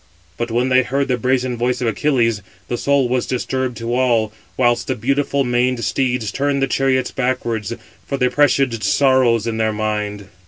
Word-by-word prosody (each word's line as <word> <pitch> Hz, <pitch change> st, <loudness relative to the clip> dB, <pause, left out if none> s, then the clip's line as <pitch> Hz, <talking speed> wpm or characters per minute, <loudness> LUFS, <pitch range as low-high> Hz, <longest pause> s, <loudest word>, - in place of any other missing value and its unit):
But 120 Hz, 0 st, -3 dB
when 120 Hz, +3 st, 0 dB
they 130 Hz, 0 st, +5 dB
heard 135 Hz, +2 st, -1 dB
the 125 Hz, -, +2 dB
brazen 125 Hz, 0 st, 0 dB
voice 125 Hz, +1 st, 0 dB
of 125 Hz, -, -2 dB
Achilles, 115 Hz, -1 st, +1 dB, 0.3 s
the 120 Hz, -, -1 dB
soul 140 Hz, -2 st, +2 dB
was 125 Hz, 0 st, -1 dB
disturbed 130 Hz, -1 st, -2 dB
to 115 Hz, +1 st, -3 dB
all, 120 Hz, -4 st, +1 dB, 0.2 s
whilst 120 Hz, -2 st, +2 dB
the 130 Hz, -, -1 dB
beautiful 140 Hz, +4 st, 0 dB
maned 125 Hz, -1 st, 0 dB
steeds 125 Hz, -5 st, -1 dB
turned 140 Hz, +3 st, 0 dB
the 135 Hz, -, +2 dB
chariots 130 Hz, -1 st, +1 dB
backwards, 120 Hz, -5 st, -2 dB, 0.4 s
for 140 Hz, -, -2 dB
they 125 Hz, -1 st, +2 dB
presaged 135 Hz, -4 st, +2 dB
sorrows 130 Hz, -5 st, +3 dB
in 115 Hz, -1 st, -2 dB
their 110 Hz, -1 st, 0 dB
mind. 105 Hz, -2 st, -3 dB
125 Hz, 175 wpm, -19 LUFS, 115-130 Hz, 0.4 s, they